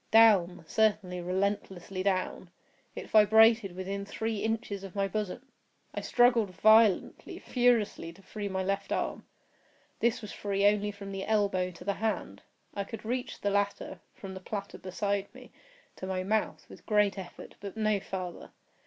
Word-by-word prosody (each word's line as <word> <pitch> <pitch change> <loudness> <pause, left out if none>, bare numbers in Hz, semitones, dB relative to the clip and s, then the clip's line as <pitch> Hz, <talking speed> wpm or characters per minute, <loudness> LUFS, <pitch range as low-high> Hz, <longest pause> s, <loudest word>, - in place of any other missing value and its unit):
Down—certainly, 200 -2 +3
relentlessly 190 0 -2
down! 185 -2 -1 0.5
It - - -6
vibrated 220 -2 +5
within 195 +2 -4
three 220 +2 -3
inches 220 -3 -2
of 195 -1 -9
my 195 -1 +1
bosom! 215 +6 -4 0.4
I - - -3
struggled 240 -4 +3
violently, 215 -1 +4
furiously, 240 -9 +1
to 195 +3 -19
free 205 +1 -5
my 190 0 -2
left 195 +1 -2
arm. - - -2 0.7
This 235 -1 +1
was 210 - -7
free 200 -1 -1
only 205 0 +3
from 200 -1 -8
the 195 0 -4
elbow 200 -4 +1
to 180 0 -12
the 200 +2 0
hand. 220 -1 -2 0.3
I 200 - -2
could 225 +2 -9
reach 245 +2 -3
the 205 - 0
latter, 200 -2 -1 0.2
from 195 -1 -8
the 190 - -7
platter 200 +1 -6
beside 200 +2 -2
me, - - -13 0.5
to 185 - -6
my 185 -1 -2
mouth, 215 +3 -1
with - - -15
great 210 -2 +2
effort, 180 -2 -10
but 200 +1 -7
no 215 -2 +2
farther. 185 -2 -6
200 Hz, 155 wpm, -30 LUFS, 190-215 Hz, 0.7 s, vibrated